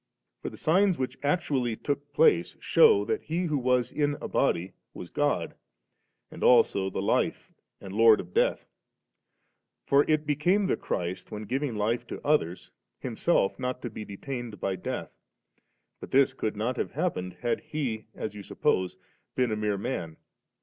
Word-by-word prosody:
For -, -, -4 dB
the -, -, -12 dB
signs 185 Hz, +3 st, +3 dB
which 130 Hz, -1 st, -3 dB
actually 140 Hz, -6 st, 0 dB
took 145 Hz, +4 st, -4 dB
place 465 Hz, -2 st, +3 dB
shew 445 Hz, -4 st, +5 dB
that 445 Hz, -1 st, -1 dB
He 170 Hz, +3 st, -2 dB
who 155 Hz, -5 st, 0 dB
was 125 Hz, -1 st, +1 dB
in 145 Hz, -1 st, 0 dB
a -, -, -5 dB
body 90 Hz, +3 st, 0 dB, 0.2 s
was 90 Hz, -, -8 dB
God, 145 Hz, -, 0 dB, 0.8 s
and -, -, -7 dB
also 100 Hz, -5 st, +4 dB
the -, -, -3 dB
Life -, -, 0 dB, 0.3 s
and 95 Hz, -1 st, -9 dB
Lord 110 Hz, 0 st, +6 dB
of 90 Hz, 0 st, -8 dB
death. -, -, +1 dB, 1.2 s
For 140 Hz, +1 st, +5 dB
it 155 Hz, 0 st, +2 dB
became 175 Hz, +8 st, +2 dB
the -, -, +1 dB
Christ, 90 Hz, +1 st, -4 dB
when 105 Hz, 0 st, -6 dB
giving 130 Hz, +3 st, -2 dB
life 110 Hz, +3 st, -1 dB
to -, -, -6 dB
others. 95 Hz, -, 0 dB, 0.3 s
Himself 95 Hz, -, 0 dB
not 125 Hz, 0 st, -2 dB
to 120 Hz, -, -4 dB
be 110 Hz, -, -6 dB
detained 115 Hz, +1 st, -6 dB
by 95 Hz, -1 st, -1 dB
death; 90 Hz, -, -5 dB, 0.9 s
but -, -, -9 dB
this 135 Hz, 0 st, +4 dB
could 110 Hz, -5 st, -3 dB
not 120 Hz, +4 st, -1 dB
have -, -, -3 dB
happened, 90 Hz, 0 st, -2 dB
had 120 Hz, -1 st, 0 dB
He, 125 Hz, -8 st, -4 dB
as 110 Hz, -, -4 dB
you 105 Hz, -, -8 dB
suppose, 95 Hz, -2 st, 0 dB, 0.4 s
been 125 Hz, -3 st, +1 dB
a -, -, +1 dB
mere 105 Hz, -1 st, -1 dB
man. 90 Hz, -8 st, -4 dB
125 Hz, 165 wpm, -28 LUFS, 105-145 Hz, 1.2 s, Lord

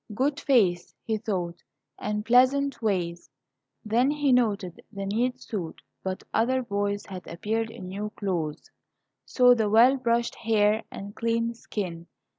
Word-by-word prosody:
"Good 275 Hz, +5 st, 0 dB
face," 190 Hz, -10 st, +2 dB
he 220 Hz, -1 st, -1 dB
thought, 180 Hz, -6 st, -3 dB, 0.4 s
"and 210 Hz, 0 st, -2 dB
pleasant 260 Hz, +3 st, +3 dB
ways." 175 Hz, -5 st, -1 dB, 0.6 s
Then 235 Hz, +5 st, +3 dB
he 290 Hz, -2 st, +1 dB
noted 210 Hz, -8 st, +1 dB
the 200 Hz, -2 st, -5 dB
neat 245 Hz, +5 st, 0 dB
suit, 190 Hz, -10 st, -5 dB, 0.2 s
but 190 Hz, 0 st, -4 dB
other 255 Hz, +3 st, +2 dB
boys 205 Hz, -2 st, -2 dB
had 185 Hz, -2 st, -9 dB
appeared 220 Hz, +6 st, -2 dB
in 190 Hz, -4 st, -9 dB
new 205 Hz, +3 st, -4 dB
clothes, 170 Hz, -7 st, -3 dB, 0.5 s
saw 250 Hz, -1 st, +5 dB
the 220 Hz, -3 st, +1 dB
well 240 Hz, +5 st, +6 dB
brushed 235 Hz, -2 st, 0 dB
hair, 215 Hz, -1 st, +2 dB
and 200 Hz, +1 st, -8 dB
clean 230 Hz, 0 st, 0 dB
skin. 180 Hz, -7 st, -5 dB
215 Hz, 140 wpm, -27 LUFS, 195-240 Hz, 0.6 s, well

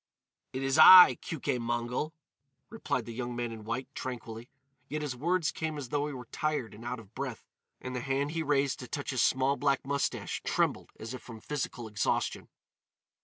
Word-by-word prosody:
"It 130 Hz, +1 st, -4 dB
is 135 Hz, +3 st, +1 dB
I, 180 Hz, +3 st, +10 dB
Keuke 140 Hz, -6 st, -2 dB
Mongol," 120 Hz, +6 st, -2 dB, 0.6 s
replied 145 Hz, -, -2 dB
the 115 Hz, -, -7 dB
young 120 Hz, +1 st, -4 dB
man 120 Hz, -1 st, -3 dB
in 110 Hz, -1 st, -8 dB
white, 115 Hz, +4 st, -3 dB
tranquilly; 120 Hz, -2 st, -6 dB, 0.4 s
yet 150 Hz, +1 st, -3 dB
his 140 Hz, -4 st, -3 dB
words 170 Hz, +5 st, +1 dB
came 160 Hz, -1 st, -4 dB
as 135 Hz, -4 st, -6 dB
though 145 Hz, +2 st, 0 dB
he 150 Hz, -, -5 dB
were 125 Hz, -2 st, -8 dB
tired 150 Hz, -7 st, -2 dB
and 105 Hz, +3 st, -12 dB
out 120 Hz, +1 st, -4 dB
of 110 Hz, -1 st, -15 dB
breath, 130 Hz, -3 st, -5 dB, 0.3 s
and 130 Hz, 0 st, -6 dB
the -, -, -1 dB
hand 140 Hz, +2 st, -1 dB
he 165 Hz, 0 st, -2 dB
raised 140 Hz, -3 st, +1 dB
to 125 Hz, -, -7 dB
touch 145 Hz, +2 st, -4 dB
his 130 Hz, -3 st, +1 dB
small 130 Hz, +3 st, +2 dB
black 140 Hz, -2 st, +1 dB
moustache 140 Hz, 0 st, -2 dB
trembled -, -, 0 dB
as 110 Hz, +3 st, -6 dB
if 130 Hz, -, -7 dB
from 115 Hz, -2 st, -10 dB
physical 125 Hz, -3 st, -4 dB
exhaustion. 105 Hz, -2 st, -1 dB
130 Hz, 190 wpm, -30 LUFS, 120-145 Hz, 0.6 s, I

